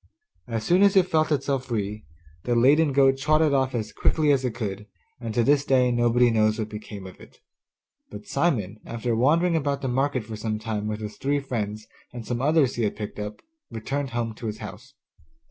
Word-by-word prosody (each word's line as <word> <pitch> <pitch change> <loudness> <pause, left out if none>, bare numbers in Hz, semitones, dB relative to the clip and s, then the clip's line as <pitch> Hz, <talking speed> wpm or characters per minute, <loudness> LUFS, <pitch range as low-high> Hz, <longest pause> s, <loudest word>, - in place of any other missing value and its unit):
As 115 -2 -3
soon 180 +9 +3
as 200 -1 +5
it 190 -2 +6
felt 155 -3 +1
itself 135 -2 0
free, 105 -5 -4 0.4
the 120 - +1
laden 145 +6 +4
goat 135 0 +4
trotted 155 +1 +3
off 130 -2 +1
as 110 -2 -3
quickly 155 -2 +2
as 135 -2 +2
it 125 -3 -2
could, 105 -3 -5 0.3
and 115 -2 -5
to 120 - +3
this 140 +2 +3
day 130 -3 +3
nobody 120 0 +3
knows 110 -1 +2
what 110 -2 -3
became 105 -2 -8
of 95 - -11
it. - - -16 0.7
But 105 0 -10
Simon, 110 - -1
after 115 0 -2
wandering 165 +8 +3
about 140 -3 -1
the - - 0
market 130 0 0
for 110 +1 -7
some 110 0 -3
time 105 -1 -3
with 110 0 -4
his 105 -1 -7
three 145 +4 0
friends 110 -5 -4 0.3
and 120 -2 -8
some 120 +1 -3
others 145 -3 +2
he 120 - 0
had 105 - -1
picked 105 0 -6
up, 105 0 -6 0.3
returned 135 +5 -3
home 120 -2 -3
to 115 - -6
his 105 0 -4
house. 115 +6 -10
120 Hz, 205 wpm, -25 LUFS, 110-140 Hz, 0.7 s, it